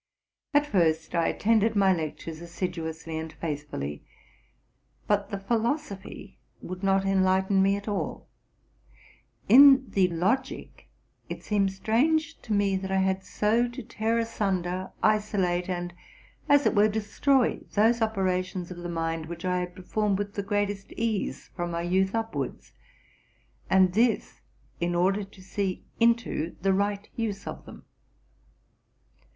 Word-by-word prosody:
At 290 0 +5
first 165 - +1
I 170 -1 +2
attended 220 0 +2
my 195 -2 +4
lectures 160 0 -5
assiduously 165 -2 -4
and 160 0 -6
faithfully, 145 - -5 1.0
but 205 -1 +1
the 200 - -3
philosophy 225 +1 -3 0.2
would 185 +1 -7
not 195 0 +2
enlighten 190 0 +3
me 195 +1 +3
at 200 +1 -7
all. 205 -2 -3 1.2
In 270 +3 +8
the 190 -2 +3
logic 195 +10 -2 0.4
it - - -6
seemed 200 -2 +1
strange 310 +11 +1
to 225 - -9
me 200 -2 +2
that 190 0 -5
I 190 - +2
had 190 0 0
so 225 +5 +1
to 240 -1 -8
tear 225 0 -1
asunder, 190 -5 -1
isolate, 195 -4 +1
and, 175 -1 -3 0.6
as 285 0 +5
it - - +3
were, 210 -1 +5
destroy, 220 +5 +1 0.2
those 225 +3 +4
operations 185 -4 -1
of 180 - -7
the 175 0 -6
mind 165 -1 -2
which 170 +1 -7
I 180 0 +1
had 180 0 -5
performed 200 +2 -1
with 205 0 -4
the 200 - -2
greatest 205 0 -2
ease 225 -3 -2
from 175 -1 -3
my 170 0 -3
youth 190 +3 +1
upwards, 225 0 -4 1.0
and 185 -1 +4
this 230 +3 +1 0.4
in 175 0 0
order 190 +4 +2
to 195 -1 -14
see 190 -1 -3 0.2
into 230 -8 +1
the 195 0 +3
right 200 +1 -1
use 210 -4 -3
of - - -7
them. - - -12
195 Hz, 140 wpm, -27 LUFS, 180-220 Hz, 1.2 s, In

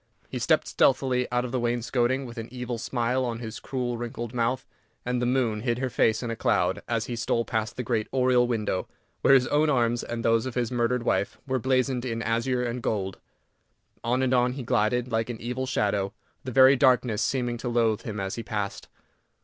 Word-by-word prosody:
He - - -4
stepped - - +2
stealthily 130 -2 +2
out 125 0 +1
of 125 - -5
the 130 - 0
wainscoting, 120 +2 0
with 120 -1 -8
an 115 - -5
evil 125 -2 -4
smile 125 +2 0
on 120 -2 -2
his 115 -1 -6
cruel, 125 -3 -3
wrinkled 120 0 -5
mouth, 125 +2 0 0.4
and 125 0 -1
the 125 - +1
moon 120 -4 +1
hid 120 0 0
her 130 0 -2
face 110 +1 +2
in 120 - -2
a - - -2
cloud 95 -2 +1
as 115 -2 -1
he 120 - -4
stole 115 0 0
past 110 0 -2
the 125 - -2
great 110 -2 -1
oriel 125 -2 +3
window, 105 -6 -1 0.3
where 135 - +6
his 125 -2 +4
own 150 +1 +3
arms 120 -3 +2
and 115 -1 -4
those 115 +2 +3
of 130 - -6
his 120 -2 0
murdered 120 0 0
wife 100 -4 0
were 130 -1 0
blazoned 130 0 +1
in 115 -2 -3
azure 115 +3 0
and 120 0 -3
gold. 95 -4 -2 0.8
On 125 +3 +1
and 130 0 +1
on 125 0 +3
he 135 -1 -5
glided, 120 +3 +1
like 115 +1 0
an 115 -2 -5
evil 125 +3 -3
shadow, 100 -5 0 0.3
the 130 - -5
very 130 +2 +7
darkness 125 -4 +3
seeming 120 -3 0
to 120 +1 -4
loathe 115 -2 +2
him 105 -2 -5
as 95 0 -3
he 115 - -4
passed. 105 -3 -4
120 Hz, 210 wpm, -26 LUFS, 115-125 Hz, 0.8 s, very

